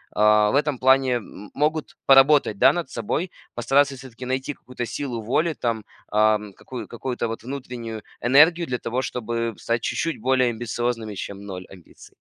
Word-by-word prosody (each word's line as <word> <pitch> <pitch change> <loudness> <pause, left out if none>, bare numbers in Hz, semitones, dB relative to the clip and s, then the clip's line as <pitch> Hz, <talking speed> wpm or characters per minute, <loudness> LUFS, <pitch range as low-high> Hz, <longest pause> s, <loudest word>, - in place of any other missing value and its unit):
в 105 0 +4
этом 150 -2 -1
плане, 130 0 +4
м, 105 -3 -7
могут 155 +2 -1
поработать, 135 -5 +5
да, - - +7
над 175 -6 -3
собой: 150 - -2 0.2
постараться 135 +4 +2
всё-таки 130 -1 -10
найти 130 +3 -2
какую-то 125 -2 -7
силу 120 -2 -4
воли 155 +9 +1
там, 115 -5 -2 0.3
ам, 105 -1 +2
какую 120 +1 -8
какую-то 120 0 -3
вот 115 0 -5
внутреннюю 120 -4 -6 0.2
энергию 160 +7 +5
для 125 - -1
того, 120 +2 -2
чтобы 115 -2 -3
стать 115 0 -1
чуть-чуть 165 +6 -2
более 130 0 +3
амбициозными, 115 -1 -3
чем 100 +1 -6
ноль 95 -2 -7
амбиций. 90 -3 -16
120 Hz, 155 wpm, -23 LUFS, 110-135 Hz, 0.3 s, да